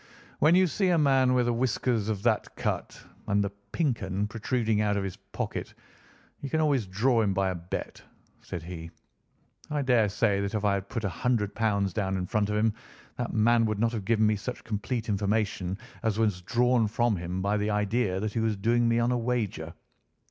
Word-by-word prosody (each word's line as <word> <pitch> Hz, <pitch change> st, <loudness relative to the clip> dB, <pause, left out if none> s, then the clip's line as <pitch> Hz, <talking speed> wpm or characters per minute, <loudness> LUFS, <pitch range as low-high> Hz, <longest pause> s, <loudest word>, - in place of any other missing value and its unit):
"When 155 Hz, +4 st, +5 dB
you 185 Hz, +1 st, +6 dB
see 185 Hz, +3 st, 0 dB
a 175 Hz, -, +4 dB
man 135 Hz, -4 st, +4 dB
with 125 Hz, -1 st, +2 dB
whiskers 120 Hz, -2 st, 0 dB
of 100 Hz, -2 st, -2 dB
that -, -, +1 dB
cut -, -, -3 dB, 0.3 s
and 100 Hz, 0 st, +2 dB
the 100 Hz, -, -2 dB, 0.2 s
'Pink 140 Hz, -10 st, 0 dB
'un' 95 Hz, +1 st, -1 dB
protruding 110 Hz, 0 st, 0 dB
out 105 Hz, -1 st, +1 dB
of 100 Hz, -, -1 dB
his 95 Hz, -2 st, -4 dB
pocket, -, -, -5 dB, 0.7 s
you 140 Hz, -, -4 dB
can 160 Hz, -, 0 dB
always 140 Hz, -9 st, +2 dB
draw 115 Hz, +6 st, +2 dB
him 100 Hz, -3 st, +1 dB
by 95 Hz, 0 st, +1 dB
a -, -, -4 dB
bet," 85 Hz, +1 st, -6 dB, 0.4 s
said 85 Hz, -, -6 dB
he. 85 Hz, -1 st, -7 dB, 0.8 s
"I 150 Hz, -1 st, -1 dB
daresay 110 Hz, -4 st, +2 dB
that 100 Hz, +2 st, -2 dB
if 105 Hz, -1 st, -1 dB
I 100 Hz, -, +3 dB
had 100 Hz, 0 st, -3 dB
put 115 Hz, -, -3 dB
£ -, -, -1 dB
100 105 Hz, +3 st, 0 dB, 0.4 s
down 95 Hz, -2 st, -1 dB
in 90 Hz, -, -2 dB
front 105 Hz, +2 st, 0 dB
of 105 Hz, -, 0 dB
him, 110 Hz, 0 st, +2 dB, 0.4 s
that 120 Hz, -, -2 dB
man 115 Hz, +2 st, +4 dB
would 110 Hz, -1 st, -1 dB
not 115 Hz, +2 st, +1 dB
have 110 Hz, -4 st, -4 dB
given 110 Hz, +2 st, +2 dB
me 105 Hz, 0 st, +2 dB
such 125 Hz, +5 st, -6 dB
complete 115 Hz, +2 st, -3 dB
information 100 Hz, -2 st, 0 dB, 0.2 s
as 110 Hz, -2 st, 0 dB
was 105 Hz, -5 st, +1 dB
drawn 120 Hz, +3 st, +2 dB
from 120 Hz, +1 st, +1 dB
him 90 Hz, +2 st, -4 dB
by 100 Hz, +1 st, +1 dB
the 105 Hz, +1 st, 0 dB
idea 105 Hz, -1 st, 0 dB
that 105 Hz, +1 st, -3 dB
he -, -, -1 dB
was 110 Hz, -1 st, +1 dB
doing 115 Hz, +4 st, +2 dB
me 115 Hz, 0 st, +2 dB
on 120 Hz, +1 st, +2 dB
a 125 Hz, -, +1 dB
wager. 115 Hz, -9 st, -2 dB
110 Hz, 205 wpm, -28 LUFS, 100-120 Hz, 0.8 s, you